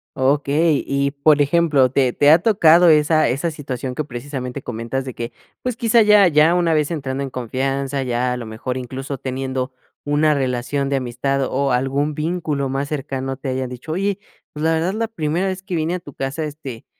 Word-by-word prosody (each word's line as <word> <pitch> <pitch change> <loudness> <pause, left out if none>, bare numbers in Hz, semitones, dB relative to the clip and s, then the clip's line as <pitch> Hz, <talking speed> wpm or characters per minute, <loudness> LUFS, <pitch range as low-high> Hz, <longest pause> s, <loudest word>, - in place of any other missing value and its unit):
Okey 145 +3 +2
y 140 0 0
por 145 +1 +3
ejemplo 145 -3 +3
¿te 130 -2 +2
te 145 +1 +5
ha 160 - +7
tocado 175 -4 +5
esa 155 0 +4
esa 140 +7 -1
situación 135 -4 -5
que 155 - -2
precisamente 130 0 -6
comentas 120 +3 -4
de 130 - -6
que 115 +1 -5 0.3
pues 250 -2 -2
quizá 230 0 +4
ya 210 -2 +6
ya 155 +1 +4
una 170 -2 +2
vez 150 -2 +1
entrando 135 -4 -3
en 135 - -3
confianza 135 +3 -2
ya 125 -1 -1
a 125 - -3
lo 115 -2 -7
mejor 120 +4 -4
incluso 130 +2 -6
teniendo 130 0 -3 0.3
una 150 +1 +3
relación 135 +1 -1
de 140 - 0
amistad 135 +2 -1
o 135 +1 0
algún 140 +4 0
vínculo 155 -3 -2
más 135 +1 -2
cercano 135 -2 -4
te 135 -1 -5
hayan 130 0 -2
dicho: 125 +5 -8
"Oye 195 +3 -1 0.3
pues 150 - -6
la 160 0 +3
verdad 165 +4 0
la 225 +1 -1
primera 165 -3 -1
vez 185 0 -3
que 190 -2 -5
vine 160 +1 -1
a 180 - -4
tu 145 -4 -12
casa, 135 +4 -3
este, 145 -6 -7
140 Hz, 200 wpm, -20 LUFS, 130-160 Hz, 0.3 s, ha